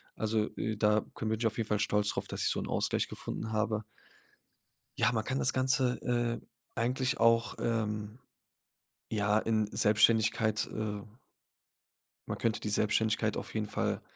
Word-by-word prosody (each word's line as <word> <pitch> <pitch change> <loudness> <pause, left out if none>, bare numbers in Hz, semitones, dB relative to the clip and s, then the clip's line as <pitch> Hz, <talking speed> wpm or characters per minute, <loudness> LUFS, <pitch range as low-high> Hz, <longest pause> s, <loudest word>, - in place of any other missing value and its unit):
Also, 110 0 0
äh, 110 -1 -2
da 105 0 +3
könn 110 - -3
bin 110 0 -1
ich 115 - +2
auf 110 - -4
jeden 115 - -1
Fall 105 - +1
stolz 105 0 +2
drauf, - - -2
dass - - -4
ich - - +3
so - - 0
'n - - -4
Ausgleich - - 0
gefunden 110 - -5
habe. 110 0 0 1.2
Ja, 125 - +3
man 110 -1 -1
kann 130 +1 -1
das 130 - +2
Ganze, 130 -1 +1
äh, 120 -1 0 0.3
eigentlich 130 +4 0
auch, 115 0 +3
ähm, 105 -1 -2 0.9
ja, 105 -1 +2
in 110 -1 +1
Selbstständigkeit, 110 0 +3
äh 105 -1 -3 1.3
Man - - -3
könnte 115 -1 0
die 105 - -3
Selbstständigkeit 110 +1 +1
auf - - -6
jeden 110 -1 -1
Fall, - - -2
110 Hz, 160 wpm, -31 LUFS, 105-115 Hz, 1.3 s, da